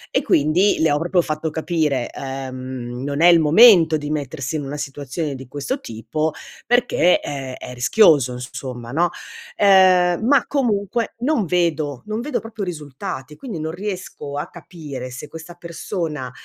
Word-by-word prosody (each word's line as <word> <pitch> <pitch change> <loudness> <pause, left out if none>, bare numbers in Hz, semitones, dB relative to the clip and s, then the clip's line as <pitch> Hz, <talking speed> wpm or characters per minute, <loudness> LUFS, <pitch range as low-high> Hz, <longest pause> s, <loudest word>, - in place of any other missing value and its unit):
E - - +4
quindi, 160 +8 +3
le 160 -2 +3
ho 145 - +2
proprio 175 +1 +2
fatto 155 0 -3
capire, 155 -5 -1
ehm, 130 -2 -6
non 145 +2 -2
è 175 - +7
il 170 -1 +7
momento 165 -1 +7
di 145 0 -6
mettersi 145 -1 -3
in 145 - -4
una 140 +2 -5
situazione 145 +1 -4
di 130 -1 -10
questo 145 - -3
tipo, 125 +8 -3 0.4
perché 245 -7 +3
è 135 -2 -5
è 125 - -8
rischioso 130 - +4
inso 125 +1 -7
somma 120 -3 -7
no. 170 +4 +2 0.5
Ehm, 185 -1 +5
ma 275 -1 +4
comunque, 230 -4 -1
non 250 -5 +1
vedo 155 -6 -1
non 215 +2 -3
vedo 295 +4 -2
proprio 225 -2 -7
risultati, 150 -4 -6
quindi 225 - -7
non 160 +1 -3
riesco 185 -7 -6
a 160 +5 -4
capire 150 -7 -8
se 130 +4 -8
questa 165 +3 -10
persona, 165 -5 -5
155 Hz, 160 wpm, -21 LUFS, 135-180 Hz, 0.5 s, è